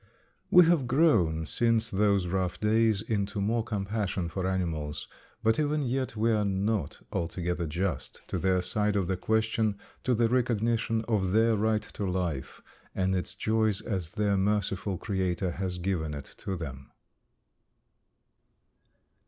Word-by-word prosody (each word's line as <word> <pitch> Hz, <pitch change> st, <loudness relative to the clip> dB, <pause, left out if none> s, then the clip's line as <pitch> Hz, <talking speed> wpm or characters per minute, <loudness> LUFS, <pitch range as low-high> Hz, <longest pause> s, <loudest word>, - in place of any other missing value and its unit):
'" -, -, -42 dB
We 180 Hz, -, +9 dB
have 160 Hz, -6 st, +3 dB
grown 110 Hz, -, +3 dB
since 115 Hz, +4 st, +1 dB
those 100 Hz, -1 st, +2 dB
rough 90 Hz, 0 st, -1 dB
days 110 Hz, -1 st, +3 dB
into 100 Hz, -2 st, -2 dB
more 110 Hz, +3 st, +1 dB
compassion 100 Hz, -4 st, -2 dB
for 95 Hz, +2 st, -2 dB
animals, 80 Hz, -6 st, -2 dB, 0.4 s
but 110 Hz, +3 st, +3 dB
even 150 Hz, 0 st, +1 dB
yet 130 Hz, -1 st, -1 dB
we 115 Hz, +2 st, +2 dB
are 105 Hz, -1 st, +2 dB
not 100 Hz, -3 st, -1 dB
altogether 85 Hz, 0 st, -2 dB
just 85 Hz, -1 st, -3 dB
to -, -, -1 dB
their 95 Hz, -1 st, +2 dB
side 105 Hz, +2 st, +1 dB
of 100 Hz, -3 st, +1 dB
the 95 Hz, +2 st, 0 dB
question, 110 Hz, +1 st, 0 dB, 0.3 s
to 125 Hz, -, +2 dB
the 115 Hz, +1 st, +3 dB
recognition 115 Hz, -2 st, +1 dB
of 95 Hz, -5 st, +1 dB
their 115 Hz, +1 st, +4 dB
right 110 Hz, 0 st, +1 dB
to 100 Hz, -2 st, -4 dB
life 85 Hz, -7 st, -3 dB, 0.3 s
and 95 Hz, 0 st, +1 dB
its 90 Hz, -1 st, -2 dB
joys 110 Hz, -2 st, +1 dB
as 90 Hz, -6 st, -4 dB
their 105 Hz, -2 st, +1 dB
merciful 100 Hz, -1 st, 0 dB
Creator 95 Hz, -2 st, -1 dB
has 90 Hz, 0 st, -3 dB
given 85 Hz, -4 st, -2 dB
it 70 Hz, -, -8 dB
to 95 Hz, -, -3 dB
them. 70 Hz, -6 st, -7 dB
100 Hz, 145 wpm, -29 LUFS, 90-110 Hz, 0.4 s, We